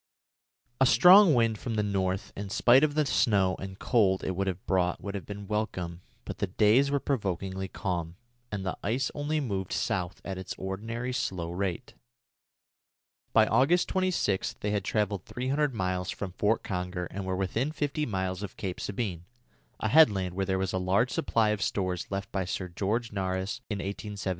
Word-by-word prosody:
A 130 - +5
strong 180 - +8
wind 115 -3 +2
from 115 -3 -3
the 105 - +1
north, 95 -2 -1
in 100 0 -5
spite 120 +6 +5
of 150 -1 +2
the 155 -1 +3
snow 100 -9 +2
and 95 0 -7
cold 100 -6 +2
it - - -1
would 95 +1 -1
have 95 -1 -3
brought, 90 -1 +1
would 100 - -6
have 100 - -6
been 100 -1 -7
welcome; 90 -5 -3 0.2
but - - -6
the 100 - 0
days 110 +8 +4
were 140 0 +1
provokingly 95 -7 -2
calm, 85 -4 -3 0.4
and 100 -2 -3
the 95 - -2
ice 125 +5 -1
only 150 +1 -1
moved 100 -9 -3
south 90 -5 -1
at 95 -1 -4
its 95 - -6
ordinary 115 +6 -4
slow 85 -8 -2
rate. 95 +5 -3 1.4
By 110 - +6
August 135 +11 +3
26 185 - 0
they 105 - -1
had 105 -2 0
travelled 105 -2 -1
300 140 +4 -1
miles 90 -2 -1
from 95 -2 -4
Fort 105 +4 +1
Conger 90 -1 -3
and 100 - -4
were 95 0 -2
within 110 - -1
fifty 150 0 -2
miles 95 -3 -2
of 100 -2 -7
Cape 95 -3 -4
Sabine, 95 -5 -3 0.5
a - - 0
headland 100 - +5
where 95 +1 -2
there 95 -1 +1
was 95 -1 -1
a 95 - 0
large 95 +7 +2
supply 110 -2 +1
of 105 -2 -1
stores 95 -2 -1
left 100 0 -4
by 95 - -1
Sir 90 0 -4
George 105 +7 -1
Nares 95 +3 -2
in 105 - -2
1876. 100 +1 -4
100 Hz, 180 wpm, -29 LUFS, 95-115 Hz, 1.4 s, strong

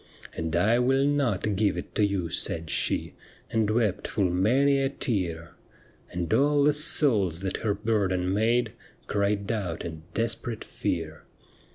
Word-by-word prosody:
' - - -17
And 80 0 -3
I 110 +7 +3
will 135 +2 +3
not 120 -8 0
give 100 -2 +1
it 90 - -7
to 105 - +1
you,' 95 -5 -1
said 80 -1 -1
she. - - 0 0.4
And 110 -2 +1
wept 110 -4 0
full 95 -5 0
many 135 +10 +3
a 135 - +1
tear; 90 - -2 0.6
And 85 -2 -2
all 145 +1 +3
the 150 +1 +4
souls 115 - +2
that 95 0 -2
her 105 -3 -1
burden 95 -4 0
made 115 +4 +1 0.3
Cried 100 0 0
out 95 -8 -3
in 80 -2 -6
desperate 115 +1 -1
fear. 80 -2 -4
105 Hz, 155 wpm, -27 LUFS, 90-120 Hz, 0.6 s, the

